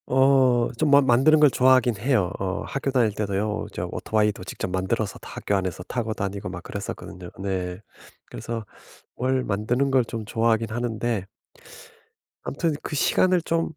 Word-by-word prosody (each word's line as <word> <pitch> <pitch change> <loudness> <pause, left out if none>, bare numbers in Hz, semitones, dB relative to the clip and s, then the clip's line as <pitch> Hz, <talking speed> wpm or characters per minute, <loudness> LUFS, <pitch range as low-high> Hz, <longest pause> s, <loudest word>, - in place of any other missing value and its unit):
어 130 -2 +4
좀 155 - +1
만 140 -1 +6
만드는 135 +5 +5
걸 150 -2 +6
좋아하긴 130 -3 +4
해요. 105 -5 +1
어 95 0 -2
학교 140 0 -3
다닐 120 -6 +2
때도요. 105 +1 -2
저 - - -4
오토바이도 105 -3 0
직접 - - -4
만들어서 95 +2 -2
다 - - -12
학교 100 - -1
안에서 95 -2 -2
타고 115 +2 -3
다니고 100 -2 -4
막 90 0 -7
그랬었거든요. 90 -3 -7
네. 95 -2 -3 0.5
그래서 115 - -6 0.5
뭘 130 +1 0
만드는 120 +7 0
걸 130 -2 +4
좀 110 -1 -6
좋아하긴 115 +1 +1
하는데 115 -3 -2 1.2
아무튼 160 +2 -1
그 - - -5
시간을 180 +5 +3
좀 165 0 0
115 Hz, 330 characters per minute, -24 LUFS, 100-130 Hz, 1.2 s, 만